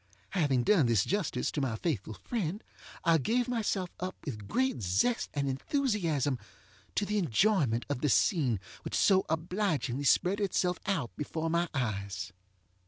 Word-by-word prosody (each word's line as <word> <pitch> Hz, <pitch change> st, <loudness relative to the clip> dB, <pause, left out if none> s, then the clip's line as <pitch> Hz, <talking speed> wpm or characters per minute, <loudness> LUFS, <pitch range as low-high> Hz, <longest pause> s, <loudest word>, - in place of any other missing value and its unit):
Having 145 Hz, -9 st, +2 dB
done 160 Hz, -, +4 dB
this 115 Hz, -4 st, +3 dB
justice 180 Hz, -10 st, -1 dB
to 145 Hz, -, -2 dB
my 125 Hz, -5 st, -1 dB
faithful 110 Hz, -, -2 dB
friend, 205 Hz, -3 st, -3 dB, 0.4 s
I 165 Hz, -2 st, +4 dB
gave 240 Hz, -, +1 dB
myself 210 Hz, -6 st, -1 dB
up 185 Hz, +1 st, -3 dB
with 105 Hz, -9 st, -6 dB
great 260 Hz, -, 0 dB
zest 100 Hz, -, +1 dB
and 140 Hz, -1 st, 0 dB
enthusiasm 155 Hz, -, 0 dB, 0.6 s
to 205 Hz, -, +1 dB
the 210 Hz, +1 st, 0 dB
enjoyment 155 Hz, -, +2 dB
of 145 Hz, -3 st, -2 dB
the 150 Hz, -, +2 dB
scene 130 Hz, -, +3 dB, 0.2 s
which -, -, -4 dB
so 190 Hz, -1 st, +4 dB
obligingly 160 Hz, -, -1 dB
spread 185 Hz, +8 st, +3 dB
itself 180 Hz, -3 st, 0 dB
out 165 Hz, -, -1 dB
before 160 Hz, +2 st, -3 dB
my 170 Hz, 0 st, +1 dB
eyes. 100 Hz, -6 st, -3 dB
160 Hz, 150 wpm, -31 LUFS, 125-195 Hz, 0.6 s, done